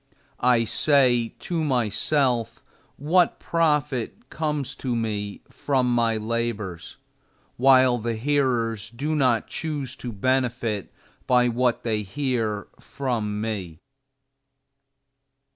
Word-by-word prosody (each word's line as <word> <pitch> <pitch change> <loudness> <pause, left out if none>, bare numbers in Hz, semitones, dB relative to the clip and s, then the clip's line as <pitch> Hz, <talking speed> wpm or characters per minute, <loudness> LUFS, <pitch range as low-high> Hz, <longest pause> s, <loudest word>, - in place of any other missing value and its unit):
I 120 -2 +4
say 125 -2 +2
to 170 -2 -2
myself 120 -2 0 0.3
what 170 +5 +2
profit 150 -7 -1
comes 150 -3 -2
to 125 -3 -2
me 105 -3 -3
from 130 -2 0
my 115 -2 +2
labors, 110 -5 -3 0.6
while 130 -1 +5
the 115 +1 -2
hearers 115 -4 0
do 140 +7 -3
not 125 -6 +2
choose 145 -6 -4
to 120 - -6
benefit 120 -2 -1 0.4
by 125 -1 +4
what 120 0 0
they 110 -2 0
hear 110 -2 -2
from 110 -6 -3
me? 100 -7 -4
120 Hz, 100 wpm, -24 LUFS, 110-135 Hz, 0.6 s, while